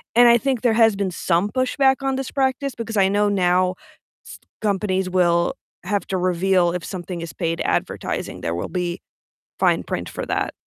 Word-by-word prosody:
And 240 0 +7
I 235 - +7
think 260 -1 -1
there 245 - +3
has 225 -2 +4
been 195 -2 -2
some 175 +3 0
pushback 265 +2 +2
on 270 -1 0
this 265 0 -4
practice 270 0 -1
because 225 -1 -5
I 195 -2 +4
know 205 +1 +2
now 185 -1 +2 0.5
s - - -10 0.2
companies 190 -2 0
will 175 -2 +2 0.3
have 205 -1 -2
to 190 - -1
reveal 180 0 +2
if 180 -1 -4
something 180 -2 -6
is 165 -4 -7
paid 165 +2 -2
advertising, - - -2
there 85 0 -2
will 85 - -4
be 180 -1 -3 0.6
fine - - +2
print - - -4
for - - -5
that. - - -1
195 Hz, 185 wpm, -22 LUFS, 180-235 Hz, 0.6 s, And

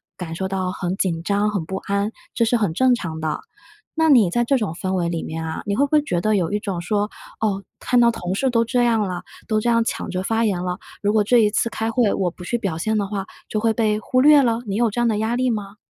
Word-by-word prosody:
感 170 -3 -6
受 190 +3 -3
到 185 -1 -2
很 185 0 -3
紧 170 -4 -1
张、 205 +2 +1
很 185 -6 -2
不 190 - -5
安， 200 +2 -1 0.2
这 230 - +2
是 240 - +2
很 205 -8 +1
正 255 +5 +4
常 160 -7 -5
的。 155 -1 -2 0.5
那 320 0 +3
你 230 -10 +6
在 240 +6 +1
这 275 +1 +3
种 205 -8 -2
氛 185 +1 -3
围 175 -2 0
里 165 -1 -2
面 160 +1 -5
啊， 160 - -4
你 200 - -1
会 280 +6 +3
不 280 - -9
会 300 -1 +5
觉 175 - -1
得 215 +1 +2
有 180 +2 -1
一 210 - +1
种 190 -5 -3
说， 205 +3 0 0.3
“哦， 200 -3 0 0.2
看 250 -1 +2
到 235 0 +6
同 180 -4 -4
事 265 +6 +1
都 230 -1 +2
这 245 +1 +1
样 225 -2 +2
了， 180 -3 -3 0.2
都 215 -2 +1
这 240 - 0
样 230 -1 +3
抢 - - -3
着 185 +1 -2
发 225 +2 +1
言 180 -4 0
了， 180 0 -3 0.2
如 205 0 +2
果 215 -1 +3
这 240 +3 +5
一 210 -2 +3
次 230 - +1
开 225 0 -2
会 230 -4 +2
我 180 -3 0
不 180 - -11
去 240 - -1
表 195 -8 -3
现 220 +5 0
的 205 - 0
话 195 -1 -4 0.2
就 215 - -1
会 225 0 +2
被 215 -2 +1
忽 255 +3 +1
略 295 0 +7
了”， 235 -2 +1
你 195 - -2
有 235 -1 +3
这 240 +3 -2
样 240 - +3
的 210 - 0
压 220 +2 0
力 255 0 +1
吗？ 205 -2 -4
210 Hz, 300 characters per minute, -22 LUFS, 185-230 Hz, 0.5 s, 略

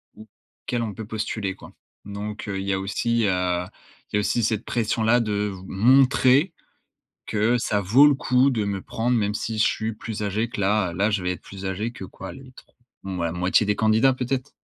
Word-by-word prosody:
où 110 - -13 0.4
quel 120 -1 -1
on 110 -3 -4
peut 110 0 -7
postuler 105 -3 -3
quoi - - -13 0.3
donc 105 +2 -6
heu, 95 -1 -2
il 95 - -4
y 100 - +1
a 95 - -1
aussi, 115 +4 0
heu 90 -2 0 0.5
il - - +1
y - - +4
a - - +3
aussi 115 +3 0
cette 110 +1 0
pression-là 115 0 +1
de 105 -2 -1
v 95 - -10
montrer 130 - +4 0.7
que 110 +3 +2
ça 105 -2 0
vaut 120 +10 +6
le 145 - +5
coup 130 0 +3
de 110 -5 -1
me 100 -1 -3
prendre 120 +5 -1
même 105 -2 0
si 110 +1 -3
je - - +5
suis 110 +1 -2
plus 110 0 -6
âgé 105 +3 -1
que 120 - -7
la 100 -2 +1
là 100 +4 +2
je 100 -3 -1
vais 90 - 0
être - - -11
plus 95 0 -9
âgé 100 +5 -2
que 120 - -10
quoi 95 +1 -9
les 135 -1 -13
tr - - -15 0.4
ouais 90 -3 -2
la - - -3
moitié 90 +4 +2
des 105 0 +1
candidats, 110 +4 +3
peut-être. 130 +2 -3
110 Hz, 220 wpm, -24 LUFS, 100-120 Hz, 0.7 s, vaut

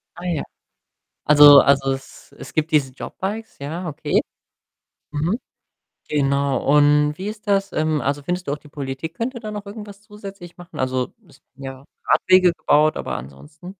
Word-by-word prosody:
Ah, 175 - -10
ja. 170 -5 -1 0.8
Also 145 -1 +9
also, 135 -1 +3
es 135 - -11
es - - -10
gibt 155 0 -1
diese 140 -4 +2
JobBikes, 210 - -6
ja, 165 +6 -5
okay. 150 0 0 0.9
Mhm. 160 +9 -1 0.7
Genau. 140 -2 0
Und 150 0 +4
wie 195 +2 -4
ist 215 0 -8
das 200 -1 +1
ähm, 155 -1 0
also, 140 +1 -2
findest 180 +1 -3
du - - 0
auch 150 - -3
die 150 - -17
Politik 140 +3 -6
könnte 240 +3 -4
da 215 - -6
noch 205 -1 -7
irgendwas 205 -1 -9
zusätzlich 200 -4 -11
machen? 175 -1 -12
Also, 130 -1 -1 0.2
es - - -21
ja, 135 0 -9 0.2
Radwege 185 -1 +5
gebaut, 155 -1 +2
aber - - -3
ansonsten 70 - -12
155 Hz, 160 wpm, -21 LUFS, 140-190 Hz, 0.9 s, Also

